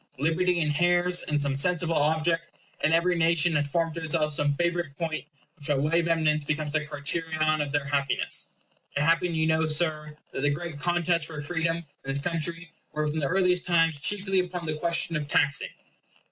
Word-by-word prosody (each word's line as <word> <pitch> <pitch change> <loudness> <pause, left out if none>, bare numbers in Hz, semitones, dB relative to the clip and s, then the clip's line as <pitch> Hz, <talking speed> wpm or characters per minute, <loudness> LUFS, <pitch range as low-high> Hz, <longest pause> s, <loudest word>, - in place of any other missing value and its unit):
Liberty 170 +5 +1
inheres 175 +3 +2
in 150 - 0
some 140 -1 0
sensible 170 +2 +1
object; 160 +2 +1 0.3
and 155 - +3
every 170 +2 +3
nation 165 0 +2
has 145 -1 +2
formed 165 +2 -1
to 165 - -6
itself 155 -1 0
some 145 0 +1
favorite 170 -2 -1
point, 160 -3 -3 0.3
which 145 - -11
by 145 - +1
way 150 +5 +2
of 170 - -1
eminence 155 -2 +1
becomes 155 0 -2
the 155 -1 +1
criterion 155 +1 0
of 145 -1 -3
their 145 -1 0
happiness. 140 -1 0 0.5
It 145 - +2
happened, 165 +1 +2
you 160 - +2
know, 160 0 +2
Sir, 155 -1 0
that - - -4
the 145 - +2
great 155 +1 -4
contests 175 0 +1
for 155 -1 -7
freedom 165 +2 -1
in 170 - -9 0.2
this 135 0 -2
country 165 +2 -3 0.2
were 150 0 -1
from 150 +1 -2
the 140 - 0
earliest 180 +1 +2
times 165 -3 +2
chiefly 195 +2 +1
upon 180 -1 -3
the 155 - -1
question 165 +1 0
of 150 -1 -2
taxing. 140 -1 +2
160 Hz, 190 wpm, -27 LUFS, 150-170 Hz, 0.5 s, and